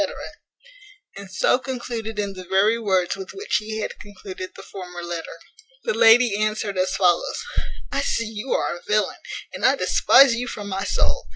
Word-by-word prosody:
And 200 -1 -9
so 220 +6 +2
concluded 235 -4 -5
in 200 -1 -2
the 185 -1 -8
very 205 +5 +3
words 190 -5 +1
with 190 -1 -9
which 395 - 0
he 220 +1 -5
had - - -5
concluded 190 -2 -9
the - - -10
former 180 -2 -8
letter. 170 -1 -5 0.5
The 475 - 0
lady 225 - +6
answered 215 -1 -1
as 185 +1 +1
follows: 180 -3 +2 0.5
"I 275 - 0
see 230 -4 0
you 220 +4 -6
are - - 0
a - - -15
villain! 210 0 0 0.3
and - - -7
I - - +5
despise 270 -3 +5
you 245 +2 -3
from 205 -1 -6
my 195 0 -2
soul. - - 0
210 Hz, 175 wpm, -23 LUFS, 190-230 Hz, 0.5 s, lady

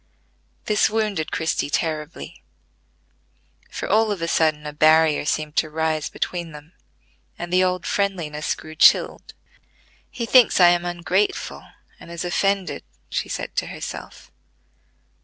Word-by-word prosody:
This 210 -1 +2
wounded 210 -7 -1
Christie 160 -2 -1
terribly; 155 0 -4 1.3
for - - -5
all 220 0 +3
of 200 - -3
a - - -1
sudden 155 -2 +1
a 150 - -5
barrier 155 0 +4
seemed 150 0 -2
to 155 - +2
rise 155 0 -1
between 170 -3 -4
them, 150 +3 -13 0.6
and 175 +1 -6
the 185 +1 +4
old 180 -1 -1
friendliness 170 -7 -1
grew 155 - -11
chilled. 155 - +3 0.7
"He 245 -3 -4
thinks 245 -3 +5
I 175 -1 +8
am 175 0 +1
ungrateful, 175 +3 -2 0.3
and - - -13
is 170 +1 -5
offended," 195 +2 0 0.3
she - - -2
said - - -5
to - - 0
herself. - - -8
170 Hz, 135 wpm, -22 LUFS, 155-190 Hz, 1.3 s, I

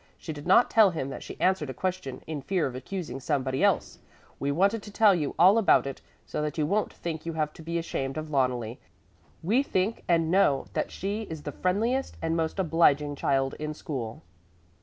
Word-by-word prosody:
She 160 - -6
did 145 +1 -9
not 195 +6 +5
tell 220 -3 +6
him 155 -6 -4
that - - -7
she - - -9
answered 185 -6 +1
a 130 - -5
question 180 -5 -3
in 155 -2 -5
fear 180 +3 0
of 130 - -3
accusing 135 0 -5
somebody 135 -2 -1
else. - - +1 0.4
We 140 +1 0
wanted 200 +8 +2
to 205 - -10
tell 210 -1 +5
you 155 -6 -2
all 190 +6 +6
about 210 - +4
it 135 -1 -6 0.2
so - - -3
that 150 +1 -3
you 155 - +1
won't 205 +7 0
think 160 -2 -5
you 165 - -4
have 155 -1 -1
to - - -12
be 170 +1 -3
ashamed 135 -4 -3
of 155 0 -5
Loneli. 125 -4 0 0.6
We 220 +10 +3
think 210 -4 -1
and 165 -2 +2
know 160 -8 +3
that - - -1
she 205 +3 -4
is 160 -2 -7
the 145 - -4
friendliest 225 - -1
and 165 0 -1
most 160 +1 -1
obliging 150 -5 +3
child 135 -1 0
in 150 0 -4
school." 135 -1 -5
160 Hz, 205 wpm, -27 LUFS, 140-190 Hz, 0.6 s, tell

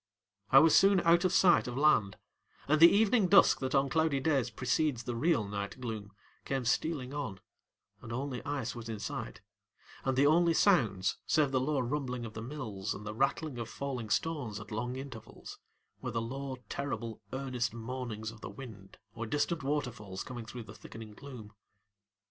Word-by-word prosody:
I 135 - +6
was 160 +3 +7
soon 195 -1 +6
out 170 +2 +4
of 185 - +3
sight 180 -5 +5
of 125 +1 -4
land, 140 -9 +3 0.5
and 155 +2 +3
the 170 - +11
evening 215 0 +3
dusk 195 +2 +6
that 130 0 -2
on 135 0 +3
cloudy 155 -1 +1
days 135 -4 +1
precedes 125 +2 0
the 120 -1 -4
real 140 -5 +1
night 100 +3 -5
gloom 110 -5 -5 0.3
came 135 -2 -2
stealing 135 +1 0
on 130 -10 -4 0.6
and 115 - -9
only 130 +1 -3
ice 140 -4 -3
was 115 -1 -8
in 110 - -3
sight, - - -5 0.6
and 130 -1 0
the 140 - +5
only 165 +2 +4
sounds, 115 - +3
save 150 -3 +3
the 130 - +2
low 145 +2 0
rumbling 125 -2 -3
of 110 - -8
the 110 - -6
mills 115 -6 -4
and 105 - -9
the 105 - -4
rattle 135 +2 -1
of 115 -1 -5
falling 130 -5 -4
stones 125 -6 -1
at 105 - -11
long 120 +4 -3
intervals, 130 -4 -9 0.4
were - - -3
the 115 - -1
low, 130 +3 -5
terribly 115 -5 -4
earnest 130 -3 -2
moanings 115 -1 -5
of 115 -1 -15
the - - -6
wind 105 -8 -11 0.2
or 115 0 -5
distant 150 +7 0
waterfalls 125 -9 -3
coming 120 -3 -7
through 120 +1 -7
the - - -11
thickening 110 -1 -10
gloom. 115 -4 -10
130 Hz, 180 wpm, -32 LUFS, 115-145 Hz, 0.6 s, the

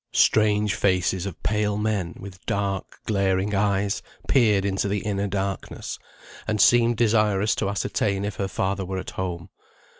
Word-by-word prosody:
Strange 105 -1 +3
faces 95 -2 +1
of 95 - -9
pale 105 -1 0
men, 105 -5 -1
with 95 -1 -10
dark 100 -1 -2
glaring 100 -1 +1
eyes, 100 0 +1 0.3
peered 105 -7 +3
into 95 0 0
the 100 0 -1
inner 100 -1 -1
darkness, 100 0 -4 0.5
and 110 -1 0
seemed 120 +2 +5
desirous 105 -2 +3
to 100 - -1
ascertain 100 0 -1
if 105 -2 -4
her 100 - -1
father 95 0 -1
were 95 +1 -4
at 95 - -5
home. 90 -1 -4
100 Hz, 150 wpm, -24 LUFS, 95-105 Hz, 0.5 s, seemed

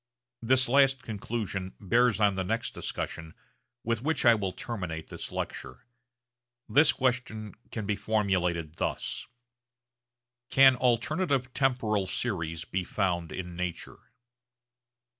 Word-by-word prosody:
This 130 +3 +3
last 135 0 +4
conclusion 100 -3 -4
bears 115 +3 +3
on 105 -2 +4
the 95 0 -2
next 115 +5 -2
discussion 80 -1 -5 0.5
with 115 -1 -1
which 155 +1 0
I 120 - +8
will 100 -4 -1
terminate 90 -6 -5
this - - -6
lecture. 65 - -6 0.8
This 145 +2 +5
question 125 -4 -1 0.2
can 110 -3 -4
be 105 0 0
formulated 90 -7 0
thus, - - -3 1.2
Can 135 -1 +7
alternative 130 +2 +1
temporal 115 -7 +1
series 85 -6 -2
be 95 0 -2
found 90 -3 -1
in 90 -1 -6
nature? 90 -1 -5
110 Hz, 115 wpm, -29 LUFS, 90-125 Hz, 1.2 s, I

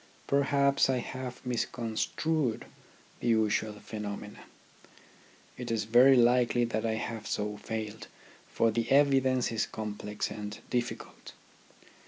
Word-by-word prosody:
Per 140 0 +2
haps 140 -1 +3
I 130 - +2
have 130 +1 -6
misconstrued 120 +3 -1 0.5
the - - -3
usual 110 -1 +2
phenomena. 105 -1 -7 1.2
It 125 - -5
is 115 -2 0
very 125 +5 +6
likely 120 0 +4
that 115 -1 -2
I 110 - 0
have 110 0 -5
so 105 0 -2
failed, 110 0 -5 0.4
for 115 0 +2
the 115 +1 -1
evidence 135 -3 +3
is 115 -1 0
complex 105 -1 -4
and 105 0 -6
difficult. 120 -1 -4
115 Hz, 120 wpm, -30 LUFS, 110-130 Hz, 1.2 s, very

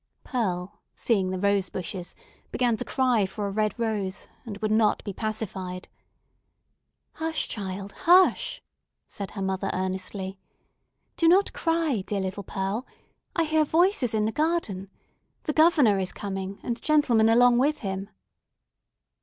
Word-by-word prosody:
Pearl, 195 -5 -3
seeing 195 -6 +1
the 185 - -2
rose 200 -1 +1
bushes, 180 0 -6 0.4
began 245 -2 +2
to - - -3
cry 250 -7 +2
for 205 +2 -4
a 200 - -2
red 215 0 0
rose, 210 -5 -2 0.2
and 205 -3 -5
would 215 0 -2
not 215 -1 +3
be 200 - -5
pacified. 195 -4 -4 1.3
"Hush, 320 -1 -2
child—hush!" 200 - +2 0.4
said 200 -1 -7
her 195 - -5
mother, 190 0 -1
earnestly. 190 +1 -4 0.8
"Do 330 - +3
not 380 +4 +4
cry, 325 - 0
dear 205 - -1
little 190 +1 -3
Pearl! 195 +5 -3 0.5
I 335 - +3
hear 310 0 +2
voices 320 - +2
in 210 -1 +2
the 220 - 0
garden. 260 - -1 0.5
The 300 - -1
Governor 295 - +5
is 185 -1 -2
coming, 195 -1 -5
and 235 -1 -3
gentlemen 250 -8 +4
along 240 +1 +5
with 295 +4 +1
him." 195 -2 -4
215 Hz, 135 wpm, -26 LUFS, 195-260 Hz, 1.3 s, Governor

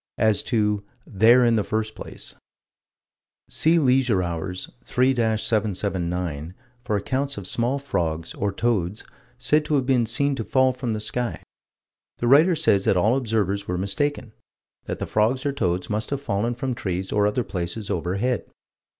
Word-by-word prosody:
As 110 -2 +3
to 105 -4 0 0.2
"there 115 +5 +5
in 115 -1 +3
the 105 - +1
first 110 +1 -2
place": - - -9 1.2
See 165 +2 +3
Leisure 125 - +3
Hours, 90 +2 -4 0.2
3 130 +2 +2
779, 95 - -1 0.3
for 110 -3 0
accounts 135 +6 -2
of 100 - -6
small 120 +7 0
frogs, 85 - -2
or 100 0 -1
toads, 100 -3 -1 0.3
said 150 +4 +2
to 150 - 0
have 135 -3 +1
been 125 -3 +2
seen 140 +5 +1
to 115 - -2
fall 130 +3 +3
from 125 -3 -3
the 110 - -2
sky. 110 +3 -3 0.7
The - - -2
writer 155 +7 +6
says 105 -11 +3
that 95 - +3
all 110 +7 +3
observers 105 -6 -1
were 90 - -1
mistaken: 115 +5 -2 0.5
that - - -4
the - - -3
frogs 115 +6 +1
or 140 - +2
toads 90 -9 -1
must 110 +1 -2
have 140 - -2
fallen 115 -2 -1
from 130 +1 -2
trees 95 -4 -3
or 105 0 +3
other 110 +4 0
places 95 +2 -4
overhead. 100 +9 -1
110 Hz, 160 wpm, -24 LUFS, 95-125 Hz, 1.2 s, writer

